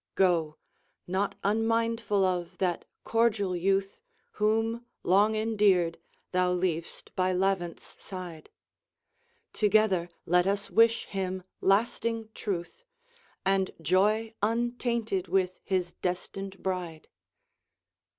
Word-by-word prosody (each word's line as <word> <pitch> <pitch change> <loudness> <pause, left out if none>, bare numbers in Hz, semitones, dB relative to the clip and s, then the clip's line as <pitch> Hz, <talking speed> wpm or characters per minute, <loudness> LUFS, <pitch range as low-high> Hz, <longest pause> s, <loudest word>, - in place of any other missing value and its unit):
Go, 165 -5 +2 0.5
not, 190 +3 -1
unmindful 225 -1 +1
of 180 -1 -2
that 180 -2 -1 0.2
cordial 220 -5 +1
youth 195 +2 0 0.3
Whom, 225 +2 0 0.2
long 205 +4 +4
endeared, 205 -6 +2 0.3
thou 180 0 +2
leav'st 170 -2 -3
by 185 0 +1
Levant's 180 -2 -2
side; 180 -5 -8 1.0
Together 210 -5 +3 0.2
let 180 +2 +3
us 200 +1 -1
wish 230 +1 +4
him 185 -1 -3 0.2
lasting 225 +2 +1
truth, 195 - -4 0.6
And 195 0 +1
joy 210 +7 +2
untainted, 230 -3 0
with 185 -1 0
his 185 -2 -1
destined 190 +2 -4
bride. 180 -4 -3
195 Hz, 95 wpm, -29 LUFS, 180-220 Hz, 1.0 s, long